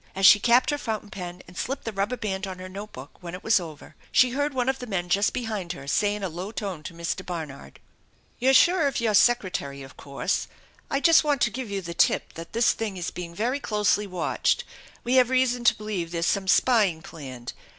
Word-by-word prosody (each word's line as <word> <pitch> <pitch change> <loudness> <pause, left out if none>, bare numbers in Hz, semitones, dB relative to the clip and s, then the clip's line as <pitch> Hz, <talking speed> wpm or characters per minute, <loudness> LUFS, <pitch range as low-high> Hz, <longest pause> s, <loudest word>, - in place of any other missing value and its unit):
As 195 0 +2
she 205 - +9
capped 240 +6 +4
her 290 - -2
fountain 215 -4 -4
pen, 180 -1 -7
and 180 - -14
slipped 270 +8 -3
the 225 - -3
rubber 205 +5 -2
band 195 -3 -3
on 185 -1 -6
her 185 0 -8
note 200 +3 -8
book 130 +3 -10
when 175 0 -6
it 185 - -10
was 220 -2 +4
over, 160 -4 -10 0.2
she 250 -1 +5
heard 285 +3 0
one 255 -2 -1
of 265 0 0
the 250 - -7
men 180 -4 -2
just 200 +3 +3
behind 215 -8 -3
her 140 - -10
say 205 +8 +1
in 210 - -6
a - - 0
low 180 +4 -6
tone 190 -5 -5
to 165 - -9
Mr. 170 +2 -3
Barnard: 160 -7 -7 0.3
" - - -37
You're 265 +2 +4
sure 340 +2 +5
of 275 - -1
your 225 -2 +1
secretary 185 - +2
of 135 - -13
course? 140 -1 -2 0.4
I 275 - 0
just 330 0 +6
want 290 -3 +1
to 215 - +3
give 250 -2 -5
you 200 -1 -3
the 170 0 -5
tip - - +2
that 165 0 -9
this 235 +1 +3
thing 215 -4 -4
is 175 - -3
being 170 -1 -7
very 245 +8 -1
closely 210 -4 +1
watched. 180 -3 0 0.4
We 250 +2 +2
have 250 -1 +5
reason 255 -2 +1
to - - +5
believe 205 -5 -4
there's 170 0 -2
some 195 +1 0
spying 195 -7 +3
planned. 130 -7 -8
200 Hz, 235 wpm, -25 LUFS, 175-240 Hz, 0.4 s, she